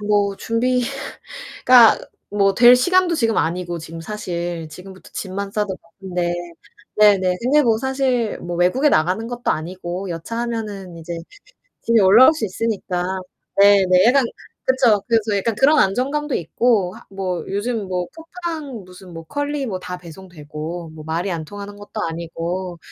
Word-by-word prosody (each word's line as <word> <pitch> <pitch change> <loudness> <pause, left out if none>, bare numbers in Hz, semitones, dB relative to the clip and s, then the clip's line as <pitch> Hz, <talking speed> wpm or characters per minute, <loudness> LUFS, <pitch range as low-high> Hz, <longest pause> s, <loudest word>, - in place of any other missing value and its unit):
아 - - -7
뭐 205 -1 +2
준비가 250 +4 -1 1.3
뭐 200 -1 +2
될 240 +3 +8
시간도 360 +5 +3
지금 225 -6 +1
아니고 175 +1 -2
지금 165 +1 -9
사실 175 -4 -4
지금부터 185 +4 -12
짐만 195 +1 -4
싸도 205 -3 -1
바쁜데 175 0 -4 0.7
네네. 195 -4 +5
근데 280 +5 +3
뭐 225 -4 +2
사실 260 -3 0
뭐 175 0 -5
외국에 180 - +3
나가는 180 - +1
것도 245 0 -2
아니고 180 +3 -5
여차하면은 210 0 -5
이제 170 +1 -6 0.7
집에 230 -1 +3
올라올 215 +9 +7
수 305 - -3
있으니까 195 -3 -2 0.6
네네 195 -2 +6
약간 265 +2 +5 0.4
그쵸. 245 -6 +3
그래서 220 -3 +2
약간 220 +2 -1
그런 285 +6 +4
안정감도 275 +9 0
있고 190 +2 +1
하 - - -14
뭐 190 -2 -3
요즘 205 0 -2
뭐 180 -1 -2
쿠팡 325 - -6
무슨 180 0 -14
뭐 165 0 -8
컬리 290 - -3
뭐 190 -5 -4
다 180 0 -6
배송되고 165 -1 -8
뭐 155 -1 -10
말이 165 +5 -2
안 165 -2 -4
통하는 205 +4 -9
것도 205 +1 -7
아니고 170 +2 -5
200 Hz, 300 characters per minute, -20 LUFS, 180-235 Hz, 1.3 s, 될